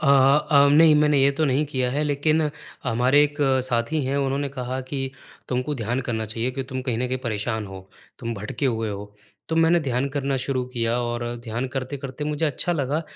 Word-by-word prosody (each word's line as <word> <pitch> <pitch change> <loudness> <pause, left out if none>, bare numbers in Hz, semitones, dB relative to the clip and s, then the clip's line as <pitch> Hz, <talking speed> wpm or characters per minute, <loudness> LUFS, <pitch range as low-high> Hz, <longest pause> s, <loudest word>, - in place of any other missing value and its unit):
अ 140 - +1 0.4
अ, 140 -1 +6
नहीं 160 0 +7
मैंने 150 -1 +4
ये 140 - +5
तो 160 - +3
नहीं 140 +1 +2
किया 130 -3 -1
है 145 +3 0
लेकिन 155 +2 +1 0.4
हमारे 125 +4 +4
एक 145 0 -4 0.3
साथी 130 +5 0
हैं, 135 +2 -1
उन्होंने 140 +1 0
कहा 130 -1 -4
कि 135 -2 -2 0.4
तुम 125 0 0
को 150 +3 -3
ध्यान 120 +1 -2
करना 110 -2 -1
चाहिए, 115 +3 -2
कि 135 +1 -4
तुम 130 0 -5
कहीं 125 -3 -2
न 125 - 0
कहीं 130 0 -1
परेशान 110 -1 -2
हो, 95 0 -10 0.3
तुम 115 -1 -4
भटके 105 +7 -3
हुए 115 -3 -1
हो। 105 +1 -7 0.3
तो 160 - -1
मैंने 165 +1 +4
ध्यान 130 -1 -1
करना 140 -1 0
शुरू 130 -1 -1
किया 115 0 0
और 120 0 -2 0.2
ध्यान 120 +3 -2
करते-करते 135 +1 -4
मुझे 150 +1 -1
अच्छा 150 +5 0
लगा, 150 +1 -1
130 Hz, 205 wpm, -24 LUFS, 120-145 Hz, 0.4 s, नहीं